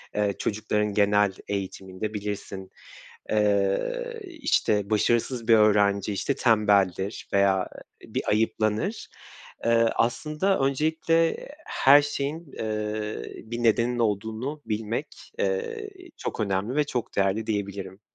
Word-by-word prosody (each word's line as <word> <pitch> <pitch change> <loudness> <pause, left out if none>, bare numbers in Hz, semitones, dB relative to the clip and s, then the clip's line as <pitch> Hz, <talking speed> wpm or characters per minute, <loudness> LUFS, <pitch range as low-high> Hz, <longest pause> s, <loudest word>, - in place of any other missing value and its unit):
eee, 105 -1 +1
çocukların 105 -1 -1
genel 105 -1 +3
eğitiminde 95 +1 -4
bilirsin, 100 -2 -5 0.6
eee, 105 - +1
işte, 110 - 0
başarısız 115 +2 +1
bir 115 - +6
öğrenci, 105 -1 +3
işte, 135 +8 -1
tembeldir 100 -3 +2
veya 100 -1 +3 0.3
bir - - -4
ayıplanır. 110 - 0 0.6
Eee, 115 0 +4
aslında 150 +11 +1
öncelikle 160 +4 +1 0.2
her 140 +2 +6
şeyin, 145 +2 -4
eee, 105 - -3 0.2
bir 120 +1 -4
nedeninin 120 +2 +2
olduğunu 110 +7 -2
bilmek, 110 +5 -2 0.3
eee, 460 -3 -2 0.3
çok - - -5
önemli 100 +3 -1
ve 150 - +3
çok 125 -5 -4
değerli 100 +3 +1
diyebilirim. 100 -2 -4
110 Hz, 105 wpm, -26 LUFS, 100-135 Hz, 0.6 s, bir